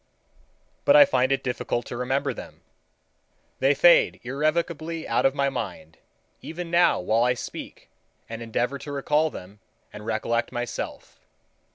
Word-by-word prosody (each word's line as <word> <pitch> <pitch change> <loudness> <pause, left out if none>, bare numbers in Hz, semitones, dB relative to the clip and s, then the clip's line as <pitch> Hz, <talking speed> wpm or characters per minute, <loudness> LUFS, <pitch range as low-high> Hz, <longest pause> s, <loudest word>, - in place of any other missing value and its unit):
But 285 - +5
I 290 -1 +10
find 130 - +1
it 135 0 0
difficult 125 -1 -2
to - - -7
remember 135 +3 -1
them. - - -11 1.0
They 135 +2 +3
fade 175 +4 +5
irrevocably 160 +4 -2
out - - +3
of 135 - -3
my 140 -1 +1
mind 85 - -6 0.4
even 165 +1 -7
now 175 +1 +4
while 110 +6 +1
I 125 +1 +2
speak - - -8 0.4
and 115 0 -7
endeavor 120 +4 -2
to 145 - -8
recall 150 +3 +1
them, 100 -4 -11 0.3
and 105 - -9
recollect 115 +2 -1
myself. 120 -2 -6
135 Hz, 145 wpm, -25 LUFS, 120-155 Hz, 1.0 s, I